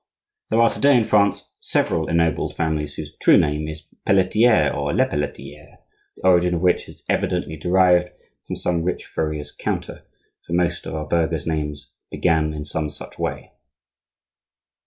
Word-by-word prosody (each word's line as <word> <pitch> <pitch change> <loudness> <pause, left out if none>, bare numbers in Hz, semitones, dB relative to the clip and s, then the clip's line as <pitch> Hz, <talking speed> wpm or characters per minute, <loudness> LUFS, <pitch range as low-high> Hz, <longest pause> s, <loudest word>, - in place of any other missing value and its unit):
There 110 - +2
are 115 0 +5
to - - -7
day 140 -2 +6
in 120 - +3
France 100 -2 +1
several 80 -1 0
ennobled 85 -3 0
families 75 -3 -2
whose - - -8
true - - +6
name 75 +1 +1
is 80 0 -8 0.2
Pelletier 100 -2 +3
or 70 0 -1
Lepelletier, 110 - -3 0.4
the - - -9
origin 90 -1 +4
of 85 - -2
which 90 -1 +1
is - - -15
evidently 80 - -1
derived 90 +2 +3 0.4
from - - -4
some 85 -2 -1
rich 90 +2 -3
furrier's 75 -2 -4
counter, - - -4 0.4
for 85 - -5
most 85 -1 0
of - - -5
our 75 -1 -3
burgher's 80 -1 0
names 75 -2 -3 0.2
began 80 -2 +1
in 75 -1 -6
some 75 0 -3
such 75 - -12
way. - - -4
85 Hz, 155 wpm, -22 LUFS, 75-90 Hz, 0.4 s, day